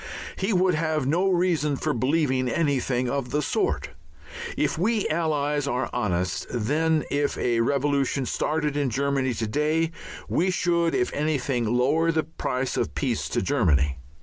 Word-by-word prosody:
He 195 +3 -1
would 185 -1 +3
have 155 -2 0
no 175 +8 +2
reason 170 -5 +1
for - - -1
believing 130 0 +1
anything 130 -4 0
of 135 -1 -2
the 150 +3 0
sort. - - -1 0.7
If - - +1
we 210 +5 +1
Allies 150 -3 0
are 125 -2 -1
honest, 95 -4 -1
then 150 +7 +1
if 145 0 0
a 120 -1 +1
revolution 140 +1 +1
started 150 +2 -1
in 145 -2 +1
Germany 135 0 0
to 115 - -2
day 155 +7 0 0.4
we 180 +3 +1
should 170 -2 +1
if 125 - 0
anything 140 -5 0
lower 155 +7 +2
the 160 -1 +1
price 130 -5 -3
of - - -2
peace 125 -6 -1
to 120 - -1
Germany. 75 - +2
145 Hz, 150 wpm, -25 LUFS, 125-160 Hz, 0.7 s, would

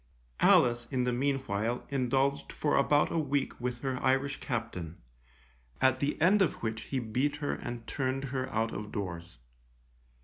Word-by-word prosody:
Alice, 120 -1 +5
in 130 -3 0
the 125 0 +1
meanwhile, 125 -4 -1
indulged 135 +1 +1
for 150 - 0
about 145 +1 +3
a 165 - +1
week 145 -4 -1
with 125 -1 -3
her 130 -2 -2
Irish 135 +1 +1
captain, 90 - -4 0.8
at 130 0 +3
the 145 +1 -1
end 190 +6 +5
of 180 - +3
which 110 0 -2
he 135 - -3
beat 130 +5 0
her 145 -1 -2
and 120 -2 -6
turned 135 0 -2
her 130 -1 -2
out 115 +1 0
of 105 0 -6
doors. 90 - -5
130 Hz, 160 wpm, -30 LUFS, 115-140 Hz, 0.8 s, Alice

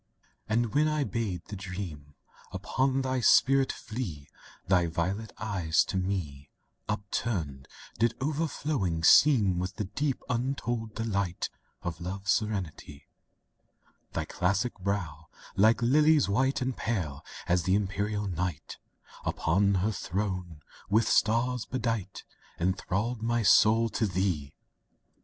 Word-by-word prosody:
II - - -42 0.3
And 120 -2 +1
when 150 +2 +3
I 155 -1 +1
bade 105 - -3
the 105 - -7
dream 90 -7 -7 0.4
Upon 135 0 0
thy 130 0 0
spirit 135 +2 +5
flee, 100 - -6 0.4
Thy 90 -2 +3
violet 95 +7 -2
eyes 95 -7 +1
to - - -5
me 90 -7 -3 0.4
Upturned, 100 - -3 0.3
did 115 +1 +2
overflowing 140 - -1
seem 105 - +6
With 90 +1 -3
the 105 - -2
deep, 135 +8 -2
untold 120 -3 -2
delight 100 -5 -2 0.3
Of 85 -1 -4
Love's 95 +2 -2
serenity; 95 -9 -3 1.0
Thy - - -2
classic 100 +7 0
brow, 90 -5 -3 0.3
like 110 +5 +4
lilies 150 +4 +4
white 130 +7 +1
And 130 -1 -2
pale 90 -12 -3 0.2
as 90 0 +3
the 95 +3 +2
Imperial 105 +1 -1
Night 90 -4 -4 0.4
Upon 100 +5 +2
her 110 - +1
throne, 90 -5 -3 0.3
with 110 +2 +3
stars 120 +2 +2
bedight, 115 -6 -3 0.4
Enthralled 95 +6 -1
my 120 0 +1
soul 110 +3 +5
to 110 0 0
thee! 90 -7 -1
100 Hz, 120 wpm, -29 LUFS, 90-120 Hz, 1.0 s, seem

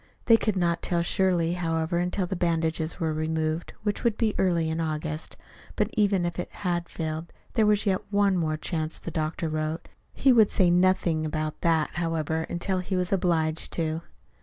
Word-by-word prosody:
They 230 - +7
could 215 -2 0
not 170 -2 +1
tell 170 -1 0
surely, 175 -2 +2
however, 165 -1 -1
until 180 +2 0
the 190 - -3
bandages 165 -2 -1
were 160 -2 0
removed, 155 +1 -2
which 205 -1 -2
would 235 -3 +1
be 220 -3 +1
early 170 -4 +2
in 160 +1 -1
August. 155 0 -3 0.4
But - - 0
even 200 -4 +2
if 175 0 -3
it - - -3
had 175 -2 -2
failed, 160 0 -4 0.2
there 220 -2 +3
was 210 0 +3
yet 190 -2 +1
one 200 -1 +3
more 155 -3 0
chance, 155 0 -3
the 170 - -7
doctor 160 +1 -2
wrote. 155 +1 -3 0.2
He 265 -1 +4
would 220 -4 +6
say 180 -2 +3
nothing 175 -3 +2
about 155 0 -3
that, 160 -2 +2
however, 160 -1 -1
until 185 +2 -1
he 185 +1 -3
was 180 +1 0
obliged 165 -4 +1
to. 160 -1 -1
170 Hz, 185 wpm, -26 LUFS, 160-185 Hz, 0.4 s, They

